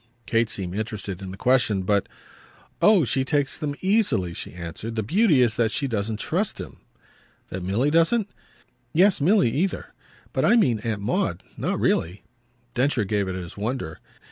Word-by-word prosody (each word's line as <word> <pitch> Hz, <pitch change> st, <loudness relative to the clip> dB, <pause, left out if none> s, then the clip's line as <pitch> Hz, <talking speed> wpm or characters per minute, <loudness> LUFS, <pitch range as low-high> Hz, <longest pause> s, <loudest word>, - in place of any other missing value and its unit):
Kate 115 Hz, -1 st, +1 dB
seemed 90 Hz, -4 st, -5 dB
interested 105 Hz, -3 st, -4 dB
in 95 Hz, -, -6 dB
the 95 Hz, -, -8 dB
question, 115 Hz, -5 st, +2 dB
but 100 Hz, +1 st, +1 dB, 0.7 s
"Oh 210 Hz, -5 st, +6 dB
he 130 Hz, +1 st, +1 dB
takes 145 Hz, 0 st, 0 dB
them 145 Hz, -3 st, -3 dB
easily," 190 Hz, -, +1 dB
she -, -, -6 dB
answered. 90 Hz, +6 st, -6 dB
"The 110 Hz, -, -1 dB
beauty 165 Hz, -, +4 dB
is 115 Hz, -3 st, 0 dB
that 115 Hz, -2 st, +2 dB
she 140 Hz, +4 st, -1 dB
doesn't 110 Hz, -2 st, -2 dB
trust -, -, -1 dB
him." -, -, -8 dB, 0.7 s
"That 95 Hz, -, -5 dB
Milly 105 Hz, +11 st, +1 dB
doesn't?" 165 Hz, +7 st, +3 dB, 0.7 s
"Yes 185 Hz, 0 st, +4 dB
Milly 185 Hz, -, +4 dB
either. 170 Hz, +10 st, -2 dB, 0.4 s
But -, -, 0 dB
I 235 Hz, -, +5 dB
mean 125 Hz, -, +3 dB
Aunt 110 Hz, -2 st, -3 dB
Maud. 100 Hz, -5 st, -1 dB
Not -, -, -2 dB
really." 90 Hz, +5 st, 0 dB, 0.5 s
Densher 125 Hz, -3 st, +1 dB
gave 100 Hz, 0 st, 0 dB
it 95 Hz, -, -3 dB
his 90 Hz, -2 st, -7 dB
wonder. 110 Hz, -5 st, -3 dB
115 Hz, 170 wpm, -24 LUFS, 100-145 Hz, 0.7 s, Oh